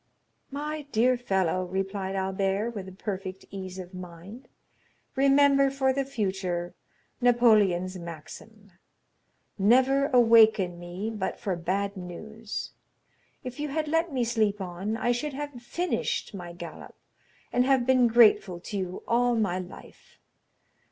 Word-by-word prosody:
"My 295 +1 -5
dear 245 +3 +3
fellow," 190 -6 0
replied 195 +1 -3
Albert, 195 +3 -1
with 190 -4 -8
perfect 190 -2 -5
ease 190 -1 -7
of 185 0 -8
mind, 185 +6 -10 0.7
"remember, 275 0 +5
for 265 -1 +1
the 275 0 -1
future, 190 -8 -2 0.5
Napoleon's 210 -7 +3
maxim, 185 +6 -11 0.9
'Never 260 +7 +4
awaken 220 -8 +5
me 180 +5 -5
but 210 -4 -4
for 200 -6 -2
bad 195 +4 -2
news;' 210 +4 -7 0.7
if 255 +2 -7
you 295 - -2
had 305 +2 -2
let 325 +2 +1
me 255 -3 0
sleep 220 -3 +1
on, 190 +4 -4
I 240 +2 +1
should 275 +5 -2
have 285 -3 -6
finished 345 -1 -2
my 175 -3 -7
galop, 170 -2 -10 0.6
and 250 - +4
have 265 -2 +3
been 255 -1 +4
grateful 220 -6 +4
to 200 +3 -6
you 185 -1 -5
all 240 +1 +2
my 195 -5 0
life. 180 0 -12
210 Hz, 130 wpm, -27 LUFS, 185-250 Hz, 0.9 s, remember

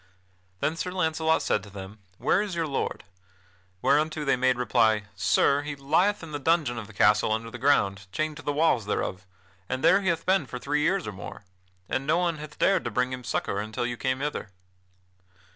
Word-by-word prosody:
Then 155 - 0
Sir 180 - -2
Launcelot 160 -3 +1
said 105 - +1
to 100 - -12
them: 100 +2 -9 0.2
"Where 190 - +2
is 205 -4 -3
your 165 -1 0
lord?" 140 -3 -3 0.8
Whereunto 155 +1 +2
they 135 - +3
made 130 0 +2
reply: 115 -4 +2
"Sir, 140 +8 +3
he 145 0 -5
lieth 165 +9 +1
in 160 - -8
the 145 - -3
dungeon 145 -5 +1
of 105 - -8
the 110 - -14
castle 105 +1 +4
under 115 +1 -2
the 120 - -8
ground 100 -7 +2
chained 155 +8 -2
to - - -8
the 145 - -2
walls 145 -8 +2
thereof, 95 -1 -2 0.4
and 130 0 -2
there 195 - +5
he 190 - -3
hath 170 -2 0
been 185 -6 +2
for 125 - -6
three 145 +4 -1
years 185 +4 +1
or - - -4
more, 100 +1 -9 0.4
and 135 +2 -2
no 155 - +3
one 170 -3 0
hath 150 0 -9
dared 195 - +3
to - - 0
bring 125 0 0
him 125 0 -6
succor 100 -3 -2
until 110 +3 -3
you 120 0 -2
came 130 +2 -1
hither." 145 -7 -3
140 Hz, 210 wpm, -27 LUFS, 110-160 Hz, 0.8 s, there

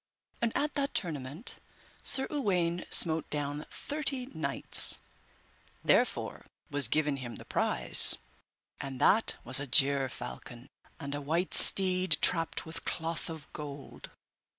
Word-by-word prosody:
And 235 -1 0
at 295 +1 -1
that 280 -1 -3
tournament 150 - -2 0.4
Sir 265 - +1
Uwaine 180 - -1
smote 160 -2 +4
down 145 0 -4
thirty 280 -4 -3
knights, 160 - +4 0.8
therefore - - 0 0.2
was 145 -1 +2
given 150 -2 -1
him 120 -3 -8
the - - -11
prize, - - +4 0.6
and 135 -2 -7
that 220 +3 +4
was 130 +1 +1
a 145 - -6
gerfalcon, 130 -2 -1 0.3
and 140 0 -5
a 145 - -5
white 165 +6 -2
steed 185 -4 +3
trapped 165 -2 +1
with 160 0 -8
cloth 165 -1 -4
of 160 -3 -9
gold. 145 -2 -9
155 Hz, 125 wpm, -29 LUFS, 140-185 Hz, 0.8 s, smote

